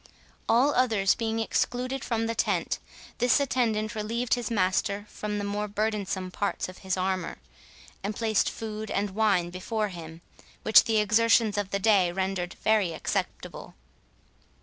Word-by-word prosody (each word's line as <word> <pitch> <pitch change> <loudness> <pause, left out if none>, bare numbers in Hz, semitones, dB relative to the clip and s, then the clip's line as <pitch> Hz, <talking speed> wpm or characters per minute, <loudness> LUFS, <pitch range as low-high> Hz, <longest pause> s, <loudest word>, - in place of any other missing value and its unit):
All 260 +6 +4
others 220 -6 +3
being 225 -1 -2
excluded 250 +3 -1
from 225 -1 -1
the 230 - -1
tent, - - 0 0.4
this 245 +3 +4
attendant 235 -5 0
relieved 225 +2 -1
his 240 -3 -1
master 200 0 0
from 210 -1 -4
the 205 - -2
more 205 +1 -2
burdensome 205 -3 -2
parts 200 +2 -2
of 185 - -11
his 190 0 -2
armour, 185 -1 -2 0.7
and 205 +2 -3
placed 220 -2 +1
food 220 -1 -6
and 200 0 -1
wine 195 -4 +1
before 210 +4 -2
him, 165 -2 -9 0.4
which 220 - +7
the 225 -1 +1
exertions 220 0 +3
of 205 -2 -1
the 200 - 0
day 195 -4 +3
rendered 190 -1 -2
very 210 -6 +3
acceptable. - - -4
210 Hz, 150 wpm, -27 LUFS, 190-225 Hz, 0.7 s, which